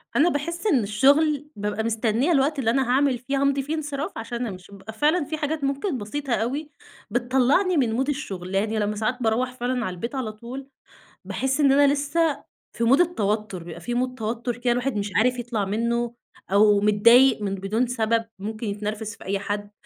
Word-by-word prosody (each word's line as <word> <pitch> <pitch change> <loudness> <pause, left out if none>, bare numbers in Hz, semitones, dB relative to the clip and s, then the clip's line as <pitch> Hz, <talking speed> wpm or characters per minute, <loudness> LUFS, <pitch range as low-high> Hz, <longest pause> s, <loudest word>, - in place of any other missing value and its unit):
أنا 330 +5 +5
باحس 335 +7 -3
إن 275 - +3
الشغل، 280 +8 +3
بابقى 210 +1 -2
مستنية 230 +6 +1
الوقت 285 0 +2
اللي 225 -4 +1
أنا 265 +1 +1
هاعمل 265 0 +3
فيه 265 +3 -3
هامضي 280 0 +2
فيه 300 +4 -2
انصراف 295 +2 -3
عشان 235 +1 -4
أمشِي، 185 -1 -9
بيبقى 200 +2 -10
فعلًا 300 +7 +2
في 315 +2 -4
حاجات 300 0 -2
ممكن 275 +3 -1
بسيطة 255 +5 -3
أوي 275 +7 -2 0.4
بتطلّعني 260 - +2
من 245 -2 +1
mood - - -3
الشغل، 195 -10 -4
يعني 215 +2 0
لمّا 210 0 -1
ساعات 220 +4 -1
باروّح 235 +3 +1
فعلًا 250 -1 -2
على 185 - -3
البيت 235 +9 -5
على 250 -5 -2
طول، 240 +5 -9 0.6
باحس 265 +2 -1
إن 280 -2 +5
أنا 280 0 +5
لسه 295 +2 0 0.3
في 235 - -2
mood 265 +6 +5
التوتُّر، 210 - 0
بيبقى 165 -1 -9
في 240 - -4
mood 255 +1 -1
توتُّر 230 +2 -3
كده 240 0 +1
الواحد 245 0 -1
مش 205 -1 -2
عارف 250 +3 +3
يطلَع 235 -4 -2
مِنُّه 235 +4 -1 0.4
أو 205 0 +5
متضايق 230 +4 +5
من 195 -1 -1
بدون 200 +6 -1
سبب، 230 -2 0
ممكن 215 +3 -5
يتنرفز 210 +1 -4
في - - -14
أي 195 +1 -1
حد، 205 +1 -4
240 Hz, 190 wpm, -24 LUFS, 215-275 Hz, 0.6 s, أنا